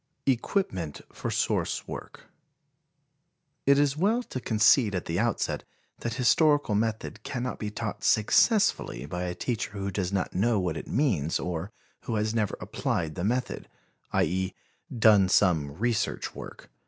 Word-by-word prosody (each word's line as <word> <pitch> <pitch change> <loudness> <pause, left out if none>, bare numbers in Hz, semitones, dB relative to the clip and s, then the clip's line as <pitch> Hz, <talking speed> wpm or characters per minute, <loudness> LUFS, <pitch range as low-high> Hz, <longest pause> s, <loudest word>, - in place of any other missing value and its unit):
Equipment 115 - -1
for - - -4
Source - - -1
Work. - - -8 1.4
It 140 0 +6
is 145 -1 +3
well 215 +9 +1
to 130 - -5
concede 110 -1 +4
at 90 - -3
the 85 +2 -1
outset 120 0 0 0.4
that 120 -1 -3
historical 140 +1 +3
method 110 +1 -2
cannot 125 -1 -4
be 105 - -3
taught 105 0 -5
successfully 110 - +3
by 90 +4 -4
a 90 0 -3
teacher 115 -4 -3
who 100 -1 -3
does 95 -1 -2
not 95 -2 -1
know 110 +3 +2
what 90 -3 -1
it - - -6
means 100 - +1
or 90 +2 -4 0.3
who 115 - -2
has 110 +1 0
never 110 -3 0
applied 80 -3 -2
the 85 - -4
method, 125 +4 -2 0.4
i. - - +3
e., 95 +3 -1 0.4
done 105 -5 +5
some 85 -8 +3
research 115 +7 -1
work. - - -10
105 Hz, 150 wpm, -27 LUFS, 90-120 Hz, 1.4 s, It